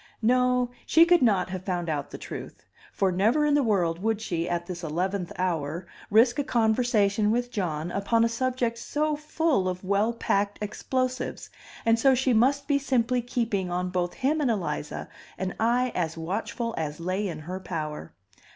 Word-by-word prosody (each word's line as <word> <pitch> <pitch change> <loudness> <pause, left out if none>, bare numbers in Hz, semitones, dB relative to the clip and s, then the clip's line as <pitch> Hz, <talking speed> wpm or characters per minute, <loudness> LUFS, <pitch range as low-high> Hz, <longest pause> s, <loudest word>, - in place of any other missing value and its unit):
No, 250 +1 +3 0.2
she 330 +1 +7
could 350 0 +5
not 200 -6 +2
have 185 -1 -5
found 180 -2 -2
out 145 -3 -2
the - - -7
truth; - - -8 0.3
for 190 -1 +1
never 225 +12 +2
in 295 - +3
the 290 - +4
world 180 -8 +1
would 220 0 0
she, 175 -5 -2
at 175 0 -1
this 175 -1 -7
eleventh 180 +3 -2
hour, 170 -2 -2 0.2
risk 240 +5 +4
a - - +2
conversation 220 -3 +2
with 245 +2 0
John 170 -6 -2
upon 225 +4 +2
a - - +4
subject 240 -1 -1
so 300 +3 -1
full 305 - 0
of 180 +1 -5
well 200 +4 +2
packed 205 -3 0
explosives; 255 +4 -3 0.3
and 230 0 +4
so 265 +1 +5
she 260 0 +2
must 265 +5 +3
be 285 -1 +3
simply 250 -2 +1
keeping 230 -6 -1
on 180 +1 -2
both 175 -1 -1
him 300 +4 +1
and 275 - +2
Eliza 165 -9 -3 0.3
an 185 0 -3
eye 245 +2 +2
as 165 -2 -2
watchful 220 +7 -3
as 150 -1 -3
lay 185 +4 -1
in 170 -4 -4
her 180 +4 -5
power. 155 - -5
210 Hz, 180 wpm, -27 LUFS, 180-250 Hz, 0.3 s, she